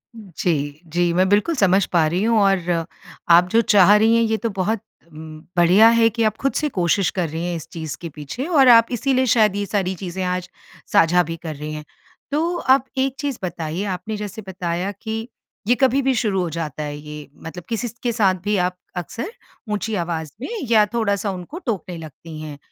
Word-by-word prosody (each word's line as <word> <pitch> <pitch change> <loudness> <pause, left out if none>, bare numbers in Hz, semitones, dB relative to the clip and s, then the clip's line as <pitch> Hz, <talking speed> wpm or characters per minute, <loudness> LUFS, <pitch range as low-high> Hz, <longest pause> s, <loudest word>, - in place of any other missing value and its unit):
जी, 165 -7 -3
जी, 175 +2 +1
मैं 185 +2 +3
बिल्कुल 210 +11 +2
समझ 195 -4 +3
पा 165 -2 +4
रही 180 +5 -1
हूँ 225 -1 +3
और, 175 -4 +1 0.4
आप 175 +1 +7
जो 230 +3 +4
चाह 205 -2 +6
रही 225 +2 +4
हैं 230 - +4
ये 220 -1 +1
तो 230 0 -2
बहुत 200 +2 -1 0.3
उम, 155 0 -10 0.2
बढ़िया 185 +6 +6
है 230 -1 +4
कि 230 +1 -1
आप 215 0 +1
खुद 275 - +1
से 300 -1 0
कोशिश 175 +2 +2
कर 180 -6 -2
रही 165 +2 -4
हैं 175 -1 -2
इस 160 - -7
चीज़ 160 -4 -6
के 170 - -5
पीछे 150 - -5
और 285 -7 +4
आप 230 - +4
इसीलिए 260 +2 +1
शायद 210 -3 +4
ये 205 0 -1
सारी 190 -2 -1
चीज़ें 185 0 -5
आज 180 0 -2 0.4
साझा 175 +2 +5
भी 165 +1 -5
कर 155 -2 -5
रही 150 +1 -6
हैं। 150 0 -6 0.5
तो 335 +4 0
आप 265 0 +3
एक 265 0 0
चीज़ 280 -4 -2
बताइए, 170 +1 -3
आपने 200 +2 -4
जैसे 210 +1 -6
बताया 180 +1 -3
कि 225 +1 -4 0.4
ये 245 - +4
कभी 265 +1 +3
भी 265 0 +2
शुरू 200 -5 0
हो 175 - -2
जाता 155 -2 -4
है, 145 0 -5
ये 150 -1 -9
मतलब 165 +2 -8
किसी 235 +1 -2
स 225 - -9
के 240 - +1
साथ 200 -5 +2
भी 210 0 0
आप 180 0 0 0.2
अक्सर 230 - -5 0.4
ऊँची 210 +1 -2
आवाज़ 165 -4 -3
में - - -4 0.2
या 215 -2 +6
थोड़ा-सा 200 -3 0
उनको 185 - -7
टोकने 190 -6 -3
लगती 160 0 -10
हैं। 150 -2 -7
190 Hz, 210 wpm, -21 LUFS, 170-225 Hz, 0.5 s, आप